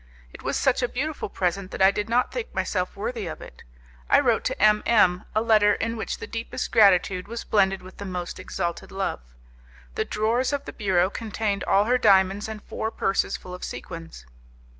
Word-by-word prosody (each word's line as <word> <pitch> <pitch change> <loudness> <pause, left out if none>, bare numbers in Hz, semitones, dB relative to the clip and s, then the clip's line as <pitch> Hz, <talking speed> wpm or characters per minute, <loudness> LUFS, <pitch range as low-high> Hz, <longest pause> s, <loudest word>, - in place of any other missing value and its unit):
It - - -11
was - - -1
such 265 -2 +2
a 245 - +1
beautiful 290 -1 -3
present 185 +1 -2
that - - -7
I 190 - +7
did 210 +2 -3
not 245 +2 +2
think 485 -2 -5
myself 180 -2 -1
worthy 215 0 -4
of 160 - -6
it. - - -12 0.5
I - - +6
wrote - - +2
to - - -2
M 210 +1 +5
M 185 -6 +3
a 215 - +2
letter 215 -2 +4
in 230 +1 -2
which 220 - -4
the - - -7
deepest 230 +2 -5
gratitude 185 -3 +4
was 235 +1 -5
blended 195 -3 +2
with 185 - -13
the 200 - -7
most 180 -2 -5
exalted 170 0 -4
love. 195 - -3 0.7
The - - 0
drawers 230 +6 0
of 285 - -2
the - - -7
bureau 190 -2 +1
contained 215 -3 -2
all 200 +1 +4
her 250 +4 +2
diamonds 195 -1 +4
and 215 -1 -7
four 220 - -3
purses 195 -3 0
full 180 - -10
of 180 - -8
sequins. 165 - -8
205 Hz, 200 wpm, -25 LUFS, 185-225 Hz, 0.7 s, I